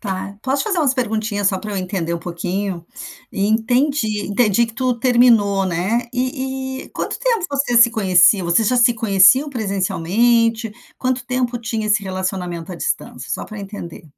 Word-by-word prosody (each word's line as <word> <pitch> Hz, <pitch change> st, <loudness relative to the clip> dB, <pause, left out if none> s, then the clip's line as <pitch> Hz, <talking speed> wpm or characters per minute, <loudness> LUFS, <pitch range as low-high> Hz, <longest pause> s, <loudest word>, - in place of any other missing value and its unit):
Tá. 195 Hz, -1 st, -5 dB
Posso 270 Hz, +1 st, 0 dB
fazer 395 Hz, -5 st, -1 dB
umas 280 Hz, -5 st, +2 dB
perguntinhas 215 Hz, -5 st, -1 dB
só 190 Hz, -, -1 dB
para 210 Hz, +2 st, -7 dB
eu -, -, -3 dB
entender 180 Hz, -3 st, -3 dB
um 170 Hz, -, -2 dB
pouquinho? 175 Hz, +1 st, -4 dB, 0.5 s
Entendi. 220 Hz, +2 st, 0 dB
Entendi 215 Hz, +2 st, +2 dB
que 225 Hz, -, -11 dB
tu 255 Hz, -1 st, 0 dB
terminou, 230 Hz, -6 st, +3 dB
né? 190 Hz, +8 st, -1 dB
E 265 Hz, +1 st, -3 dB
e -, -, -15 dB
quanto -, -, -4 dB
tempo 470 Hz, -8 st, 0 dB
vocês 275 Hz, -4 st, +2 dB
se 235 Hz, -, +4 dB
conheciam? 190 Hz, -3 st, +4 dB
Você 170 Hz, +6 st, +2 dB
já 250 Hz, +4 st, +1 dB
se 240 Hz, 0 st, +5 dB
conheciam 225 Hz, +5 st, +4 dB
presencialmente? 225 Hz, +1 st, 0 dB, 0.3 s
Quanto 255 Hz, -1 st, -1 dB
tempo 250 Hz, -1 st, -1 dB
tinha 225 Hz, -1 st, -3 dB
esse 210 Hz, 0 st, +2 dB
relacionamento 185 Hz, -2 st, -4 dB
à -, -, -5 dB
distância? -, -, -4 dB
Só -, -, -3 dB
para 215 Hz, -, -10 dB
eu 200 Hz, -, -6 dB
entender. 190 Hz, -5 st, -9 dB
220 Hz, 170 wpm, -19 LUFS, 190-250 Hz, 0.5 s, se